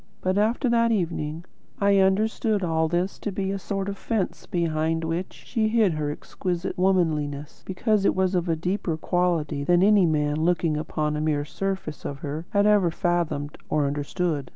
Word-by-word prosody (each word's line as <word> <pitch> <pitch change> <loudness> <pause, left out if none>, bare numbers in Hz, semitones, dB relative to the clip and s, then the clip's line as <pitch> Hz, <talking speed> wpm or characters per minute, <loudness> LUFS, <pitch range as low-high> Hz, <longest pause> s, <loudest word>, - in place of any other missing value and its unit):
But 185 0 0
after 230 +5 +1
that 230 -1 +3
evening, 165 -5 -2 0.3
I 200 -1 +4
understood 205 +2 +2
all 160 -2 +1
this 175 +4 -1
to 205 - -3
be 195 0 -2
a 195 - -3
sort 195 0 -3
of 200 -1 -5
fence 220 -5 -2
behind 165 -1 0
which 165 +3 -2
she 225 -3 0
hid 215 -5 +3
her 150 -1 -2
exquisite 175 +4 -4
womanliness, 155 -6 0
because 210 +2 +1
it - - +3
was 190 0 +1
of 175 -1 0
a 165 - +2
deeper 175 0 -2
quality 160 -4 0
than 175 +4 +4
any 205 -3 +5
man 150 -1 +1
looking 165 -1 +1
upon 150 0 -2
the 150 - -2
mere 150 -2 0
surface 170 -1 -4
of 140 - -4
her 150 +4 -5
had 200 0 +2
ever 205 -4 +4
fathomed 170 -5 -1
or 150 -1 +2
understood. 145 +1 -2
175 Hz, 175 wpm, -25 LUFS, 155-195 Hz, 0.3 s, any